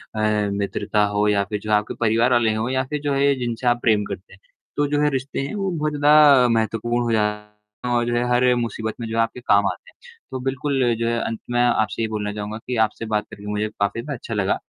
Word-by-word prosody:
अ, 105 -1 +1
मित्रता 100 +1 -1
हो 105 +1 +2
या 100 -1 +2
फिर 105 +1 -4
जो 105 +1 -5
है 105 - +6
आपके 105 - -3
परिवार 115 +2 +2
वाले 115 -2 +3
हो 110 +2 -1
या 130 0 0
फिर 150 -1 -3
जो 145 -1 -1
है 140 0 +1
या 140 - +4
जिनसे 120 0 -3
आप 120 0 +2
प्रेम 105 -3 +3
करते 95 -1 -8
हैं। 95 - -17 0.4
तो 145 - +2
जो 145 +1 0
है 150 - +3
रिश्ते 135 +1 -3
हैं 140 - -5
वो 195 -2 -1
बहुत 155 -3 -2
ज़्यादा 145 -3 +6
महत्वपूर्ण 115 +1 0
हो 120 - -1
जाते 105 +1 -3
हैं 120 - 0
और 120 - +1
जो 120 0 -1
है 120 - +1
हर 125 +1 +4
मुसीबत 115 -2 -3
में 115 - -4
जो 115 - -3
आपके 115 +2 0
काम 100 -3 +3
आते - - -6
हैं। 480 -1 -19
तो 130 - -4
बिल्कुल 135 -1 0
जो 115 - 0
है 115 0 0
अंत 115 - -3
में 120 0 +2
आपसे 115 -2 +1
ये 110 - 0
बोलना 105 -1 -3
चाहूँगा 105 +1 -5
कि 125 - -2
आपसे 110 +1 -7
बात 105 - 0
करके 100 - -11
मुझे 105 +1 -1
काफ़ी 100 +2 -2
ज़्यादा 145 +3 -5
अच्छा 115 - -7
लगा। 100 -3 0
115 Hz, 255 wpm, -22 LUFS, 105-125 Hz, 0.4 s, है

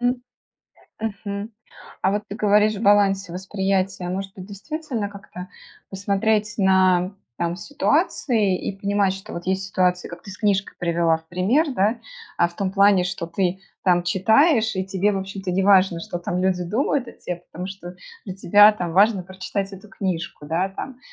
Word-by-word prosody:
М, 245 +1 0 0.8
мгм. 200 -1 -4 0.5
А 190 - +3
вот 205 - -1
ты 200 - -6
говоришь 210 +1 +3
в 200 - -6
балансе 200 -3 +3
восприятия, 190 0 -1
может 190 +1 -4
быть, 185 -1 -9
действительно 235 +2 -4
как-то 195 -2 -10 0.4
посмотреть 205 +2 0
на, 190 -1 +3 0.2
там, 170 0 -1
ситуации, 240 - +1
и 195 - -5
понимать, 200 -1 +1
что 195 0 -9
вот 170 0 -7
есть 190 +1 -1
ситуации, 180 -1 +1
как 175 0 -10
ты 200 - -10
с 185 - -10
книжкой 200 -1 0
привела 170 -1 +2
в 160 - -24
пример, 200 - +2
да? 210 +4 +1 0.4
А 170 - +4
в 170 - -19
том 190 -2 -2
плане, 200 -2 +5
что 180 -2 -4
ты 185 +2 -1 0.2
там 175 -2 +4
читаешь, 220 - +3
и 190 - -1
тебе, 195 +2 +1
в 195 - -1
общем-то, 190 0 -5
не 190 +2 +1
важно, 190 -3 +4
что 175 +1 -5
там 175 +1 -3
люди 185 -1 +1
думают 245 +6 0
о - - -9
те, 180 - -6 0.2
потому 180 +2 -5
что 190 -2 -8 0.3
для 190 - -6
тебя, 205 +3 +6
там, 180 -5 -4
важно 200 +1 +4
прочитать 190 +2 -5
эту 195 +2 -11
книжку. 180 -6 -4
Да? 175 +5 0
Там. 245 +6 -7
195 Hz, 175 wpm, -23 LUFS, 180-205 Hz, 0.8 s, тебя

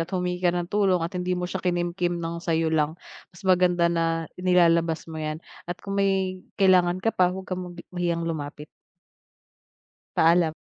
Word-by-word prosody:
at 165 - -2
humingi 180 -1 -2
ka 180 - +3
ng 175 +1 -2
tulong 195 -3 +3
at 170 - -4
hindi 180 0 -1
mo 180 - -2
siya 185 +1 -3
kinimkim 175 0 -1
ng 170 0 -4
sa'yo 165 -1 0
lang. 155 +1 +1 0.3
Mas 180 +1 -17
maganda 180 -2 +3
na 165 -1 0 0.2
inilalabas 170 -3 +3
mo 160 -1 -7
'yan 155 0 -3 0.3
at 175 - -3
kung 195 - -4
may 190 -1 0 0.2
kailangan 185 -2 +4
ka 225 - +2
pa, 180 -1 +3
huwag 190 +1 -5
kang 185 0 -4
magi 175 -1 -8
mahiyang 170 -1 -1
lumapit. 150 -2 -5 1.5
Paalam. 165 -1 +4
175 Hz, 175 wpm, -25 LUFS, 165-180 Hz, 1.5 s, kailangan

